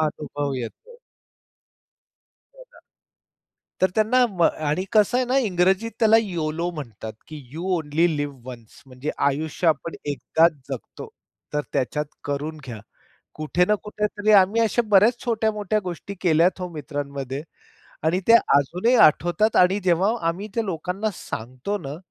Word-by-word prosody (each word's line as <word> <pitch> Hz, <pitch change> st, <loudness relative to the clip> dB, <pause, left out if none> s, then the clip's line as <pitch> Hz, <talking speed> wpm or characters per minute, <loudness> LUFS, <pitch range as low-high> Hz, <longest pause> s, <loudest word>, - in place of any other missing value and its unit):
अनुभव 145 Hz, -2 st, -2 dB
येतो. 280 Hz, -, -8 dB, 1.6 s
हो -, -, -13 dB
ना. -, -, -19 dB, 1.0 s
तर 185 Hz, -1 st, +3 dB
त्यांना 235 Hz, +4 st, +3 dB
म 175 Hz, -3 st, -2 dB, 0.3 s
आणि 170 Hz, +6 st, 0 dB
कसं 215 Hz, +2 st, +4 dB
आहे 255 Hz, -, +2 dB
ना 260 Hz, +2 st, +1 dB
इंग्रजीत 190 Hz, +4 st, +1 dB
त्याला 220 Hz, -1 st, +5 dB
योलो 170 Hz, -3 st, -3 dB
म्हणतात 115 Hz, -, -8 dB, 0.2 s
की 155 Hz, -, -8 dB, 0.2 s
यू 165 Hz, +3 st, -6 dB
ओन्ली 160 Hz, +2 st, +1 dB
लिव्ह 145 Hz, -2 st, -4 dB
वन्स 120 Hz, -3 st, -11 dB
म्हणजे 130 Hz, +3 st, -5 dB, 0.2 s
आयुष्य 155 Hz, +4 st, -3 dB
आपण 160 Hz, +2 st, -1 dB
एकदाच 160 Hz, +3 st, +2 dB, 0.2 s
जगतो. 135 Hz, -4 st, -7 dB, 0.4 s
तर 150 Hz, -, 0 dB
त्याच्यात 150 Hz, +3 st, -1 dB, 0.2 s
करून 145 Hz, +2 st, -4 dB
घ्या. 120 Hz, -4 st, -8 dB, 0.5 s
कुठे 155 Hz, +4 st, +1 dB
ना 210 Hz, -, +2 dB
कुठे 210 Hz, 0 st, -2 dB
तरी 210 Hz, 0 st, -1 dB
आम्ही 200 Hz, +3 st, +5 dB
अशा 230 Hz, +2 st, +2 dB
बऱ्याच 210 Hz, +4 st, +5 dB
छोट्या-मोठ्या 215 Hz, -3 st, 0 dB
गोष्टी 180 Hz, +2 st, -6 dB
केल्यात 175 Hz, +2 st, +3 dB
हो 180 Hz, -, -3 dB
मित्रांमध्ये 140 Hz, -2 st, -5 dB, 0.6 s
आणि 170 Hz, +3 st, +2 dB
ते 230 Hz, -, +7 dB, 0.2 s
अजूनही 180 Hz, -, +2 dB
आठवतात 175 Hz, +8 st, +2 dB
आणि 185 Hz, +3 st, +4 dB
जेव्हा 185 Hz, +2 st, +3 dB, 0.2 s
आम्ही 185 Hz, +6 st, -2 dB
त्या 230 Hz, -, 0 dB
लोकांना 190 Hz, +3 st, -3 dB
सांगतो 130 Hz, -, -5 dB
ना, 145 Hz, -6 st, -7 dB
175 Hz, 140 wpm, -23 LUFS, 145-210 Hz, 1.6 s, ते